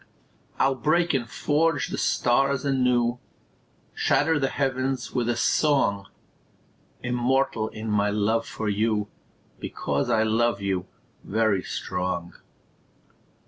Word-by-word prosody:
I'll 135 0 +3
break 155 +6 +1
and 120 -4 -1
forge 160 +6 +1
the - - -4
stars 135 +3 +1
anew, 125 -3 +2 0.7
Shatter 145 +2 +2
the 135 - +1
heavens 130 -2 -2
with 120 -1 0
a 120 - +1
song; 120 -7 +2 1.0
Immortal 125 -1 +1
in 110 0 -7
my 105 0 +2
love 105 +2 0
for 110 - -4
you, 105 0 0 0.5
Because 70 +10 -2
I 110 -2 +3
love 110 -1 +1
you, 95 -2 -2 0.4
very 110 -2 +1
strong. 90 -2 -3
120 Hz, 110 wpm, -25 LUFS, 105-135 Hz, 1.0 s, I'll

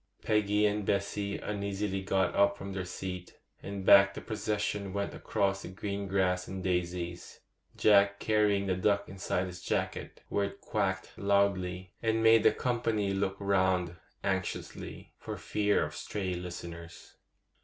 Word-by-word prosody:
Peggy 105 0 +2
and 105 0 +1
Bessy 100 +1 -1
uneasily 100 -1 -2
got 95 -1 +1
up 100 0 +3
from 100 0 -6
their 95 -1 -3
seat, 90 0 -6 0.2
and 100 -1 -6
back 100 0 +7
the - - -6
procession 105 -2 -2
went 100 0 -2
across 95 -1 0
the - - -7
green 100 +1 -4
grass 90 -1 +1
and 95 -1 -5
daisies, 90 -1 -3 0.4
Jack 100 -1 +5
carrying 105 -2 +2
the 95 - +1
duck 100 +2 +1
inside 95 -1 -2
his 90 -1 -8
jacket, - - -3
where 100 - 0
it 100 0 -7
quacked 95 -3 -1
loudly, 95 -2 +1
and 115 0 +1
made 115 0 +7
the - - +6
company 115 -5 0
look 95 0 0
round 95 -3 +1 0.3
anxiously, - - -4
for - - -6
fear 105 -1 +1
of - - -7
stray 95 -3 -3
listeners. 85 -1 -8
100 Hz, 145 wpm, -31 LUFS, 95-100 Hz, 0.4 s, back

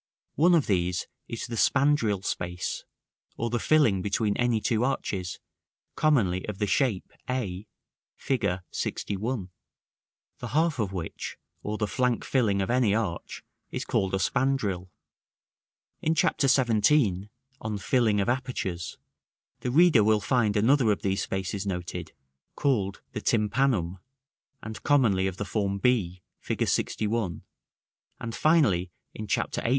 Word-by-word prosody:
One 175 +3 +5
of 160 - +3
these 90 -3 0 0.2
is 115 - -5
the 120 - -5
spandril 115 -8 +2
space, 90 0 -3 0.5
or 115 0 -2
the 120 - 0
filling 120 -12 +3
between 105 +1 0
any 120 -2 +2
two 115 +1 0
arches, 95 -9 -2 0.6
commonly 105 - +2
of 105 -2 -4
the 105 - 0
shape 105 -1 0 0.2
a, 105 -6 -3 0.5
Fig. 130 -4 -1 0.3
LXI.; 105 0 -3 0.9
the 125 - -5
half 155 +2 +1
of 105 -4 0
which, 90 -4 -5 0.2
or 105 +1 -3
the 105 - 0
flank 125 +3 0
filling 105 -7 +2
of 95 - -2
any 120 -5 +3
arch, 100 -7 -3 0.3
is - - -4
called 95 0 0
a - - +1
spandril. 105 -7 0 1.1
In 160 +1 +1
Chapter 145 -2 +2
XVII., 115 -5 +3 0.3
on 110 -1 -3
Filling 110 0 +2
of 100 - 0
Apertures, 120 -9 -2 0.6
the 125 - -3
reader 155 -4 +5
will 110 0 +4
find 110 -2 +1
another 120 +1 +4
of 105 - -2
these 95 -1 0
spaces 95 +1 -3
noted, 90 -2 -4 0.4
called 105 -9 0
the - - -5
tympanum, 105 -5 +1 0.6
and 110 +1 -7
commonly 110 -10 +3
of 95 -1 -4
the 105 - -3
form 100 0 -1
b, 95 -6 +1 0.2
Fig. - - -3
LXI.: 105 -6 0 0.8
and 115 0 -5
finally, 120 - +3 0.2
in 110 - -6
Chapter - - -1
XVIII. - - -1
110 Hz, 135 wpm, -27 LUFS, 95-125 Hz, 1.1 s, One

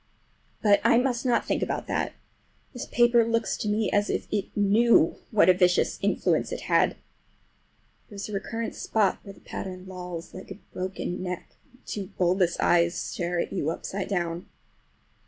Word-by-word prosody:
But 205 -2 +5
I - - +5
must 250 0 0
not 240 - +2
think - - -1
about - - -2
that. - - -2 0.6
This 245 - -6
paper 240 -1 +4
looks 230 0 0
to - - -3
me 210 0 +1
as 205 +1 +2
if - - -1
it 205 -2 0
knew 205 -2 +4
what 210 -6 +4
a 185 - +8
vicious 180 0 +2
influence - - +1
it - - -4
had! - - +2 1.1
There 210 - -11
is 200 - -5
a 210 - -8
recurrent 225 +3 -3
spot 210 -4 +1
where 200 - -10
the - - -20
pattern 185 -1 -7
lolls 180 -2 -7
like 185 - -10
a 195 - -8 0.2
broken 185 -1 -4
neck 180 -1 -5 0.2
and 250 +1 -25
two 200 -3 -4
bulbous 180 -1 +2
eyes 170 0 +3
stare 175 0 -2
at - - -2
you 145 - -1
upside 190 +3 -4
down. 175 -3 -2
195 Hz, 175 wpm, -26 LUFS, 180-220 Hz, 1.1 s, a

